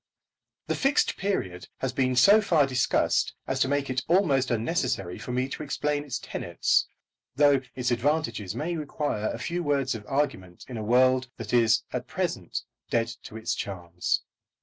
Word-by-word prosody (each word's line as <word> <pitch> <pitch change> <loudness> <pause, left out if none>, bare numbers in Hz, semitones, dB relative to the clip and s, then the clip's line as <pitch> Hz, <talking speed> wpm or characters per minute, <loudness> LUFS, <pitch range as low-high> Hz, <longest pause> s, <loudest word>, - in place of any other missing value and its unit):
The - - -1
Fixed 275 +1 +2
Period 95 - -2
has 130 -1 -2
been 130 -1 +1
so 200 +12 +7
far 165 -8 +3
discussed 130 -2 +1
as - - -2
to - - +3
make 140 0 0
it 130 -1 -1
almost 155 -8 +3
unnecessary 120 - -1
for - - -6
me 125 +1 0
to - - -6
explain 145 0 -1
its 145 - -3
tenets, - - 0 0.5
though 145 -1 +5
its 125 -1 -1
advantages 120 - 0
may 170 +3 -2
require 145 -8 -2
a - - -4
few 175 +1 -3
words 140 -4 +1
of 110 -2 -6
argument 110 -11 -2
in 125 - -6
a 110 - -4
world 130 +3 +3
that 115 -2 -6
is 115 -2 +4
at - - -3
present - - -3 0.3
dead 115 -1 +1
to 110 - -9
its 110 - -2
charms. 90 -3 -2
130 Hz, 170 wpm, -27 LUFS, 115-145 Hz, 0.5 s, so